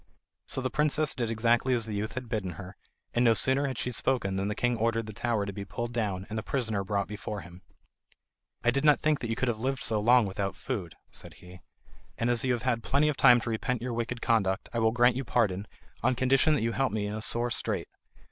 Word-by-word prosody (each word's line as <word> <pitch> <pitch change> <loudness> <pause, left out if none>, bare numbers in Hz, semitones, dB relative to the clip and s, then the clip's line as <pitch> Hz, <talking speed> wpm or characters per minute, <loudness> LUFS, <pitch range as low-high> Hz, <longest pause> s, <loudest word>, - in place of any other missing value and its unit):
So 130 - -1
the 130 -1 -2
princess 150 0 +2
did 120 -3 -2
exactly 120 +3 +2
as 115 -2 -1
the 110 - -5
youth 105 +2 -3
had 130 -1 -5
bidden 100 -5 -3
her; 95 +2 -9 0.4
and 120 - +2
no 115 -2 +5
sooner 135 +3 +1
had 130 -3 -4
she 125 - -2
spoken 115 -5 0
than 95 +1 -1
the 105 - -2
king 120 +1 +1
ordered 115 0 0
the 110 - -8
tower 115 -1 -1
to 100 - -5
be 100 - -5
pulled 115 +5 -5
down, 100 -5 -2
and 110 +1 -3
the - - -3
prisoner 110 -6 -1
brought 100 0 -1
before 105 0 -5
him. 90 +1 -13 1.0
"I 120 - +4
did 140 +3 -1
not 150 -2 +5
think 155 -1 +2
that 115 - -4
you 115 - 0
could 130 - -1
have 115 -3 -1
lived 130 +2 -2
so 110 -2 +1
long 120 +2 +5
without 100 0 -3
food," 100 -11 -5 0.2
said - - -6
he, 90 0 -14 0.6
"and 115 +1 +1
as 120 - +1
you 130 -1 +2
have 120 - -3
had 120 -3 0
plenty 145 +6 +2
of 150 - -1
time 125 -2 +7
to 115 - -3
repent 120 +1 -2
your 125 -1 -3
wicked 120 +1 -3
conduct, 100 -5 +1
I 120 - 0
will 110 0 +4
grant 120 +1 +4
you 135 - -2
pardon, 105 -5 0 0.3
on 130 +1 +2
condition 135 +5 +3
that 140 - -1
you 115 - +1
help 135 +3 0
me 105 -1 -1
in 105 - -3
a 110 - -4
sore 120 +2 +1
strait. 115 - 0
115 Hz, 250 wpm, -29 LUFS, 105-125 Hz, 1.0 s, time